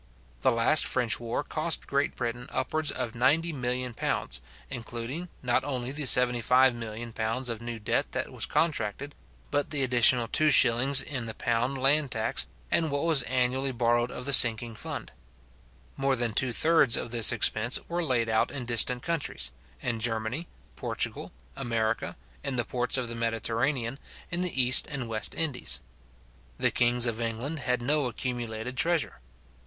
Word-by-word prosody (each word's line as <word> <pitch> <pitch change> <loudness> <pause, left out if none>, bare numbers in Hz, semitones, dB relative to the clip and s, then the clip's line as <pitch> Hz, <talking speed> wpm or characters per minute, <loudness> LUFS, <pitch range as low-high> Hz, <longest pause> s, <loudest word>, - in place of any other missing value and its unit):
The - - +2
last 115 +7 +4
French 125 -3 +1
war 115 0 -4
cost 155 +1 -1
Great 140 +1 -2
Britain 120 +1 -5
upwards 150 +4 -2
of 125 -3 -4
£90,000,000, 125 - -2 0.3
including 120 +8 -6
not 125 -1 +1
only 130 -3 -4
the 150 +2 -4
£75,000,000 120 -1 +1
of 115 -1 -5
new 120 0 -6
debt 115 +2 -2
that - - -4
was - - -2
contracted, 140 -3 -2 0.4
but 145 - -1
the 145 -3 -2
additional 125 -1 +4
2s. 135 -1 +6
in 130 -6 -4
the 110 - -5
pound 120 +3 -2
land 140 +2 +3
tax, 110 -2 0 0.2
and 160 -1 +1
what 140 0 -3
was 160 -4 +3
annually 130 +2 -1
borrowed 120 0 0
of 125 - -8
the 140 - 0
sinking 115 -2 +8
fund. 110 - -7 0.8
More 135 0 0
than 120 -3 -2
two 125 +3 +4
thirds 155 -2 +3
of 115 - -5
this 115 -2 +5
expense 115 0 +1
were 175 0 -3
laid 125 -6 0
out 110 0 0
in 135 -4 -6
distant 125 +1 +1
countries; 145 - -3 0.3
in 115 -2 -2
Germany, 115 +7 -2 0.3
Portugal, - - -4 0.2
America, 115 -3 -3 0.3
in 140 -2 -3
the 120 - 0
ports 125 +1 -1
of 125 -2 -3
the 115 - -5
Mediterranean, 115 +3 -2 0.3
in 175 +1 -2
the 180 -7 -1
East 125 0 +6
and 135 -5 -5
West 110 -1 -3
Indies. 155 -6 0 0.8
The - - +1
kings 120 0 +2
of 115 -1 -3
England 115 +7 -4
had 125 -2 -2
no 145 +1 +1
accumulated 120 -1 -5
treasure. 165 - -1
125 Hz, 155 wpm, -27 LUFS, 115-140 Hz, 0.8 s, sinking